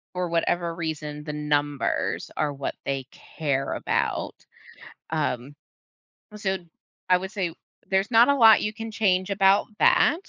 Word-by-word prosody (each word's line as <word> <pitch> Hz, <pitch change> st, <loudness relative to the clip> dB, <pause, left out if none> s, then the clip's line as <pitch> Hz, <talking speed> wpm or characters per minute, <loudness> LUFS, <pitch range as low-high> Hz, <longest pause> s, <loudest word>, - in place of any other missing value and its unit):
For 180 Hz, -1 st, -1 dB
whatever 170 Hz, 0 st, 0 dB
reason, 150 Hz, -3 st, -5 dB
the 150 Hz, -1 st, -5 dB
numbers 145 Hz, -1 st, -1 dB
are 150 Hz, -2 st, 0 dB
what 140 Hz, -1 st, -4 dB
they 135 Hz, -2 st, -2 dB
care 140 Hz, -3 st, -3 dB
about. -, -, -1 dB, 0.8 s
Um, 145 Hz, -3 st, -2 dB, 0.8 s
so, 190 Hz, -2 st, -1 dB, 0.5 s
I 180 Hz, -, +6 dB
would 190 Hz, +2 st, -6 dB
say 185 Hz, -6 st, -2 dB, 0.4 s
there's 195 Hz, +2 st, +1 dB
not 235 Hz, +3 st, +6 dB
a 280 Hz, -, +4 dB
lot 225 Hz, -4 st, +7 dB
you 210 Hz, +1 st, -2 dB
can 225 Hz, 0 st, -6 dB
change 190 Hz, -3 st, +1 dB
about 195 Hz, 0 st, +4 dB
that, 320 Hz, +4 st, +4 dB
175 Hz, 140 wpm, -25 LUFS, 150-200 Hz, 0.8 s, lot